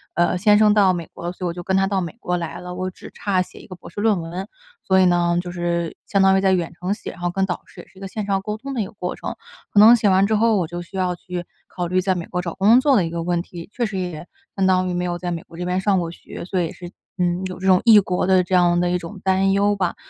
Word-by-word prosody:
呃， 175 +1 +2
先 210 +2 +4
生 210 -1 +5
到 195 -3 +4
美 170 -2 -5
国 - - -9
了， 175 - -2
所 185 - -10
以 - - +1
我 170 - -3
就 175 - -7
跟 190 - 0
他 195 - +3
到 195 -1 0
美 170 - -5
国 180 -4 -1
来 170 0 -5
了， 180 0 -7
我 185 +1 -3
只 - - -13
差 190 -3 0
写 - - -8
一 - - -14
个 185 - -9
博 175 - -13
士 205 - -8
论 210 -5 +2
文， 175 +4 -6 0.4
所 190 0 +3
以 - - +5
呢 175 -1 +2
就 175 - -7
是 170 -1 -2
相 195 -1 +2
当 190 0 +5
于 190 - +1
在 190 -1 +3
远 175 -2 -1
程 180 +3 -3
写， 210 - -7
然 - - -14
后 175 - 0
跟 190 +1 0
导 180 - -4
师 - - -13
也 - - -18
是 - - -23
一 - - -15
个 195 - -5
线 210 +2 -5
上 195 -1 0
沟 210 +1 -4
通 275 +5 -7
的 240 - -1
一 - - -1
个 - - -15
过 180 -3 -4
程。 - - -6 0.4
可 205 - +5
能 225 +3 +9
写 215 -3 +2
完 190 +1 +4
之 220 - +1
后， 225 +1 +3
我 175 -4 0
就 175 +1 -6
需 175 - -13
要 180 -1 0
去 180 0 -6 0.2
考 180 -1 -4
虑 185 +2 +1
在 190 0 0
美 170 -2 -4
国 180 - -2
找 170 -2 -5
工 215 +5 +5
作 280 -2 +4
的 190 - +3
一 165 - -3
个 170 0 -4
问 175 0 0
题， 170 -2 -10
确 240 - -1
实 210 -3 -4
也 175 -3 -5 0.3
相 195 - +1
当 185 0 +2
于 - - -2
没 175 0 -1
有 175 -1 -2
在 175 0 -4
美 165 -1 -3
国 165 - -15
这 180 - -4
边 180 +1 0
上 195 -2 +2
过 170 -1 -3
学， 170 - -10
所 185 0 -1
以 170 - 0
也 - - -8
是， 175 -1 -9 0.3
嗯， 180 0 0
有 185 0 -8
这 190 - -3
种 185 -1 +5
异 220 -3 +8
国 185 -2 -1
的 185 -1 +4
这 185 +1 -1
样 175 -1 +4
的 175 0 +1
一 180 - +1
种 180 +3 -9
担 190 0 +2
忧 205 +1 +2
吧。 185 -3 -1
185 Hz, 350 characters per minute, -21 LUFS, 175-195 Hz, 0.4 s, 能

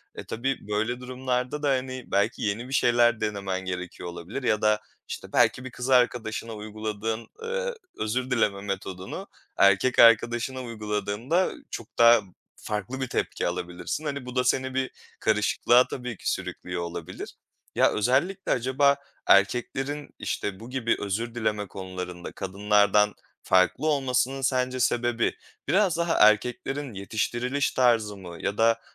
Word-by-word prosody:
E, - - -6
tabii, 130 0 -3
böyle 110 +4 -1
durumlarda 125 +2 -2
da, 145 - +2
hani, 130 -1 -1
belki 100 +1 +1
yeni 110 +3 -1
bir - - -5
şeyler 120 -2 +4
denemen 100 -3 -2
gerekiyor 90 -1 -5
olabilir 85 +10 -6
ya 110 -3 +2
da, 105 0 +3 0.3
işte, - - -7
belki 125 - +3
bir 130 - -6
kız 125 +1 -5
arkadaşına 120 -3 +2
uyguladığın, 110 +1 -4 0.2
eee, 485 +1 -2 0.2
özür 125 +4 -2
dileme 105 -5 +1
metodunu 95 -2 -5 0.3
erkek 100 +6 +4
arkadaşına 120 +3 +5
uyguladığında 110 - -1 0.2
çok 115 - -6
daha 115 -1 +7 0.3
farklı 105 +5 -4
bir 130 - -1
tepki - - -1
alabilirsin. 90 - -4
Hani, 140 -3 -3
bu 125 0 -8
da 125 - +3
seni 130 +1 +1
bir 130 0 -1 0.3
karışıklığa 110 +3 +3
tabii 125 -4 -5
ki - - -1
sürüklüyor 90 -1 -4
olabilir. 85 -1 -6 0.4
Ya, - - +4
özellikle 140 - +1
acaba 135 +3 +3 0.3
erkeklerin, 130 +8 +2
işte, 100 -2 -3
bu 115 +2 -10
gibi 125 -3 0
özür 115 +4 -3
dileme 105 -3 -1
konularında 90 -2 -7
kadınlardan 105 +1 +2 0.3
farklı 95 - +3
olmasının 135 -2 +1
sence 130 -1 0
sebebi, 120 -1 +1 0.3
biraz 185 +2 +3
daha 170 0 +1 0.2
erkeklerin 125 +5 -2
yetiştiriliş 120 +7 -1
tarzı 115 -5 +2
mı? 90 -3 -9
Ya 100 - -2
da, 115 0 +3
115 Hz, 140 wpm, -26 LUFS, 105-130 Hz, 0.4 s, daha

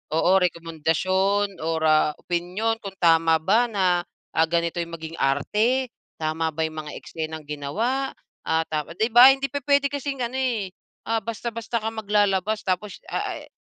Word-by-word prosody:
oo 170 +2 +3
rekomendasyon 180 +4 0
or, 160 0 -1
ah, 155 -1 +4
opinyon 180 +6 -1
kung 195 -1 -7
tama 165 -1 +5
ba 220 +8 +3
na, 185 -4 +2 0.3
ah, 160 0 +4
ganito 170 0 0
yung 170 0 -7
maging 160 0 -8
arte? 215 - +1 0.3
Tama 160 +1 0
ba 160 - -3
yung 155 - -10
mga 150 - -7
eksenang 160 -1 -6
ginawa? 220 - -2 0.3
Ah, 160 0 +1
dapat 155 +2 -4
'di 220 +2 +2
ba 245 +3 +10
hindi 275 0 -3
pupuwede 285 0 +2
kasing 280 -1 -3
ano 235 - -6
eh, 225 -8 -1 0.3
ah, 225 0 0
basta-basta 230 0 -4
ka 220 - -1
maglalabas 210 -1 +1
tapos 185 +2 -2
ah, - - -2
eh, - - -15
185 Hz, 160 wpm, -24 LUFS, 160-225 Hz, 0.3 s, ba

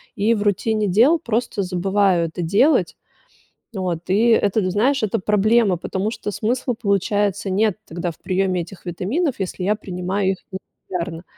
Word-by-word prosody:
и, 215 +3 +2
в 205 - -2
рутине 210 +1 +1
дел, 240 - +4
просто 230 -4 -2
забываю 185 -1 +1
это 170 - -6
делать. 200 - +2 0.8
Вот, 180 -4 -3
и 210 +5 +3
это, 205 -3 +2
знаешь, 250 +6 +1
это 215 +1 0
проблема, 210 +1 +3
потому 190 +4 -2
что 225 -2 -5
смысла, 240 +4 -1
получается, 200 -1 0
нет 205 +1 +1
тогда 175 +1 -4
в - - -18
приеме 185 -1 0
этих 175 +2 -11
витаминов, 240 - -1
если 185 -1 -4
я 210 +3 +2
принимаю 190 0 -2
их 190 - -4
нерегулярно. 180 -2 -6
200 Hz, 155 wpm, -21 LUFS, 185-220 Hz, 0.8 s, дел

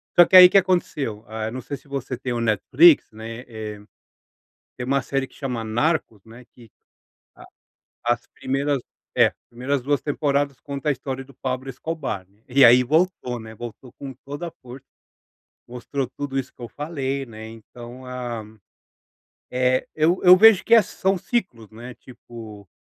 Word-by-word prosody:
Porque 175 +2 +6
aí 180 0 +12
o - - -7
que 200 - +4
aconteceu, 150 - 0 0.2
eu 110 - -4
não 130 - -6
sei 140 +4 -6
se - - -24
você 135 -3 -5
tem 125 - -4
o 120 - -2
Netflix, 125 - +4
né, 115 +2 -8
eh, 110 -2 -7 1.0
tem 125 - -5
uma 135 +1 +1
série 135 +1 -2
que - - -24
chama 125 -5 -4
Narcos, 115 - -1
né, 115 +2 -14
que, 115 -4 -17 0.7
a - - -14 0.6
as 120 0 0
primeiras, 140 +1 -1 0.4
é, - - +5 0.2
primeiras 130 +4 -2
2 145 +2 0
temporadas 140 -2 -1
conta 140 +1 -5
a - - +4
história 135 0 -6
do 135 - -17
Pablo 130 +1 -4
Escobar, 135 - -5 0.2
e 135 +2 +5
aí 125 +2 +7
voltou, 155 -3 0
né, 110 0 -11
voltou 120 +2 -10
com 135 -2 -8
toda 145 +5 -5
a - - -10
força, 125 +1 -11 0.8
mostrou 125 +2 -4
tudo 140 -1 -3
isso 130 - -5
que - - -14
eu 120 - -6
falei, 140 -2 -4
né, 110 -1 -10
então 120 +3 -12
a, 120 -3 -5 1.1
eh, 125 0 +1
eu 160 +4 +2
eu 180 0 +9
vejo 220 -1 +7
que 230 0 +6
são 190 +1 -1
ciclos, 170 - -3
né, 120 +3 -10
tipo, 110 -5 -12
130 Hz, 165 wpm, -23 LUFS, 120-145 Hz, 1.1 s, aí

